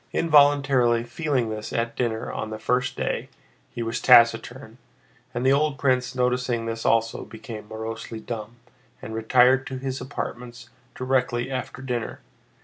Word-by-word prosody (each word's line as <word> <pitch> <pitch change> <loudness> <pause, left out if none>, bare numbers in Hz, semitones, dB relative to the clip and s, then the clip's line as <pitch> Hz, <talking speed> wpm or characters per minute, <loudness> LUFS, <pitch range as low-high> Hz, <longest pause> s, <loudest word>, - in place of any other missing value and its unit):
Involuntarily 140 -6 +4
feeling 125 -2 -1
this 105 0 -5
at 115 0 -2
dinner 115 -3 -2
on 110 - -4
the 110 - -5
first 125 +3 -1
day, - - -2 0.4
he 120 -1 -5
was 115 0 -3
taciturn, 120 0 +4 0.5
and 120 +1 -3
the 135 - +5
old 150 0 +1
prince 125 -2 +1
noticing 125 -2 0
this 115 0 -3
also 115 0 +1
became 110 -1 -9
morosely 110 +1 -6
dumb 110 0 -6 0.4
and 110 - -8
retired 125 +4 +4
to 130 - -5
his 130 0 -4
apartments 120 -2 -7 0.2
directly 130 -1 0
after 130 0 -5
dinner. 120 -3 -4
120 Hz, 140 wpm, -24 LUFS, 115-130 Hz, 0.5 s, the